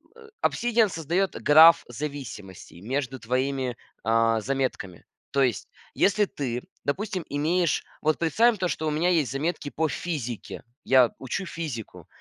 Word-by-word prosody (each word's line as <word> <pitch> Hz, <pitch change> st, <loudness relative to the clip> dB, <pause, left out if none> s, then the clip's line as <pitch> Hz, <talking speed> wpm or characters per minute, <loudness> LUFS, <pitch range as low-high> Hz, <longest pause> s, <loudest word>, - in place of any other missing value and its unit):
э, 460 Hz, -1 st, -15 dB
"Обсидиан" 235 Hz, -3 st, +2 dB
создает 170 Hz, +3 st, -1 dB
граф 160 Hz, +3 st, +7 dB
зависимостей 120 Hz, -, -8 dB
между 130 Hz, +4 st, -3 dB
твоими, 130 Hz, +1 st, -1 dB, 0.3 s
а, 115 Hz, 0 st, +3 dB
заметками. 130 Hz, -8 st, -3 dB, 0.3 s
То 140 Hz, -, +1 dB
есть, 125 Hz, -4 st, 0 dB, 0.3 s
если 205 Hz, +1 st, +3 dB
ты, 125 Hz, -9 st, -4 dB, 0.2 s
допустим, 185 Hz, +4 st, -2 dB
имеешь 160 Hz, +3 st, 0 dB, 0.2 s
вот, 155 Hz, 0 st, +1 dB
представим 220 Hz, +8 st, +3 dB
то, 185 Hz, -1 st, 0 dB
что 160 Hz, -2 st, -2 dB
у -, -, 0 dB
меня 160 Hz, +4 st, +1 dB
есть 155 Hz, -9 st, +2 dB
заметки 145 Hz, +1 st, -2 dB
по 160 Hz, +2 st, -1 dB
физике. 130 Hz, -, -5 dB, 0.2 s
Я 130 Hz, -3 st, +5 dB
учу 135 Hz, +9 st, -4 dB
физику. 150 Hz, -12 st, -6 dB
145 Hz, 140 wpm, -26 LUFS, 125-170 Hz, 0.3 s, граф